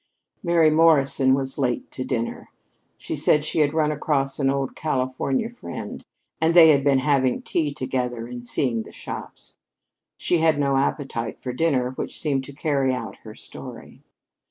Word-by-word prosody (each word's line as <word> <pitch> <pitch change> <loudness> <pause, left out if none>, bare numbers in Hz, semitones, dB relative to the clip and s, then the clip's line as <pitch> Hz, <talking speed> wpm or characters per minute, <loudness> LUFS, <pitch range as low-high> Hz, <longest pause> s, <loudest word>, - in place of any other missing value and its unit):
Mary 170 -3 +4
Morrison 140 -4 +4
was 135 +1 -3
late 125 -3 -1
to 130 - -5
dinner. 120 -3 -3 0.5
She - - -5
said 150 -1 +2
she 155 - -1
had 145 -1 +3
run 155 -1 +1
across 140 -2 -1
an 135 -1 +2
old 135 -1 -1
Californian 135 - -1
friend 240 - -8 0.4
and 165 +1 +2
they 165 -2 +9
had 140 -3 +4
been 140 -1 +4
having 130 -2 +1
tea 155 -4 -1
together 125 -3 -3
and 120 0 -8
seeing 120 -1 -1
the - - -11
shops. - - -9 0.6
She 175 - +1
had 160 -2 +3
no 140 -1 +1
appetite 135 -4 -1
for 125 - -5
dinner, 130 -3 +1
which 130 - -5
seemed 140 -4 0
to 145 - -10
carry 140 -2 0
out 125 - -5
her - - -12
story. - - -11
135 Hz, 165 wpm, -23 LUFS, 130-155 Hz, 0.6 s, they